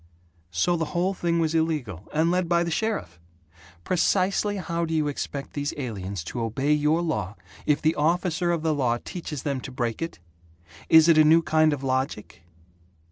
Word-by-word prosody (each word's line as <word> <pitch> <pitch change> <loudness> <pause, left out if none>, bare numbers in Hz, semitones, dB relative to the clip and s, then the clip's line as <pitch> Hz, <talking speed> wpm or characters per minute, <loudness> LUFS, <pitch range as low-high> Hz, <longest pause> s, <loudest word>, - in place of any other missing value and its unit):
"So 90 - +1
the 160 -1 -3
whole 185 +3 +1
thing 170 -2 -1
was 160 -1 +1
illegal 150 - -2
and 160 +2 +2
led 180 -1 0
by 170 0 +3
the 170 - -3
sheriff! 125 - -2 0.6
Precisely 195 +3 +1
how 170 -2 -2
do 165 -1 -2
you 155 -1 +1
expect 140 -1 -5
these 145 0 -3
aliens 100 - -5
to 120 +8 -5
obey 135 +6 0
your 150 +3 +2
law 115 - -2 0.3
if 150 -1 +2
the 155 +1 +3
officer 175 +2 +1
of 165 -2 -1
the 160 -1 +2
law 125 -5 +1
teaches 150 -1 -7
them 140 -3 -2
to 135 - -8
break 120 -1 -3
it? 165 - -4 0.7
Is 160 0 +7
it 165 -2 +6
a - - +8
new 160 +2 +5
kind 155 -1 +3
of 140 -2 -3
logic?" 130 - -2
155 Hz, 185 wpm, -25 LUFS, 130-170 Hz, 0.7 s, a